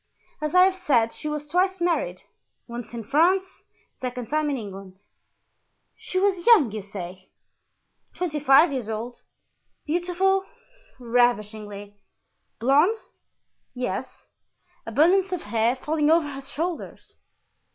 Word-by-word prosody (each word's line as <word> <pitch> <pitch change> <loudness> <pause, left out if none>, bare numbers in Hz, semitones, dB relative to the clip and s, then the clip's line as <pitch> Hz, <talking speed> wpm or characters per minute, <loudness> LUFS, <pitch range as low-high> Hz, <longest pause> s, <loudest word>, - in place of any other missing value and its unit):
As 305 +2 -2
I 365 - +8
have 380 0 +4
said, 265 -12 +1
she 305 - -5
was 300 0 -4
twice 370 +3 +1
married, 350 +8 -1 0.4
once 235 -1 -8
in 230 - -5
France, 365 - +1 0.3
the - - -39
second 250 -2 -5
time 305 0 0
in 280 - -1
England." 195 -4 -9 1.0
"She 370 - -6
was 380 -1 +1
young, 365 - +6
you 215 0 -5
say?" 185 -2 -9 0.9
"Twenty 330 -4 -2
five 290 +3 +6
years 250 -5 -4
old." 225 +3 -5 0.7
"Beautiful?" 360 +4 +1 0.5
"Ravishingly." 210 -4 -1 0.6
"Blond?" 285 - +4 0.8
"Yes." 250 0 -5 0.6
"Abundance 350 - +3
of 360 - -2
hair—falling 255 +7 0
over 325 -1 +4
her 270 - -7
shoulders?" 325 +5 -6
290 Hz, 120 wpm, -24 LUFS, 230-350 Hz, 1.0 s, I